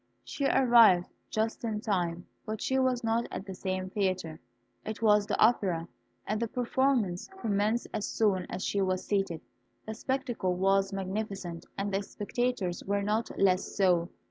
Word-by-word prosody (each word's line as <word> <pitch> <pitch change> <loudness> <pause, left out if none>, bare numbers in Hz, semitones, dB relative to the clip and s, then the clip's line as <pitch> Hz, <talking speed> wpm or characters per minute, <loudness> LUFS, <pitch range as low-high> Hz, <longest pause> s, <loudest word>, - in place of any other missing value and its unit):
She 280 - -2
arrived 235 -10 +5 0.2
just 220 +2 -1
in 220 -2 -1
time, 180 -5 -1 0.2
but 215 -1 -4
she 265 0 0
was 255 -1 +1
not 230 +1 +1
at 190 - -6
the 195 - -6
same 185 0 -3
theatre. 185 -6 -1 0.4
It 220 +1 -5
was 210 -1 +4
the - - -1
opera, 190 -7 +3 0.4
and 215 +2 -2
the 235 - 0
performance 245 - 0
commenced 215 - 0
as 210 - -2
soon 195 -5 +1
as 190 - -4
she 200 - 0
was 185 -1 0
seated. 195 -5 -1 0.4
The 220 - -4
spectacle 240 -6 -2
was 195 +1 +2
magnificent, 195 -3 -4
and 200 0 -2
the 195 - +1
spectators 205 -3 -2
were 200 +1 0
not 215 +3 0
less 190 -1 +2
so. 180 -3 +3
200 Hz, 160 wpm, -30 LUFS, 185-225 Hz, 0.4 s, arrived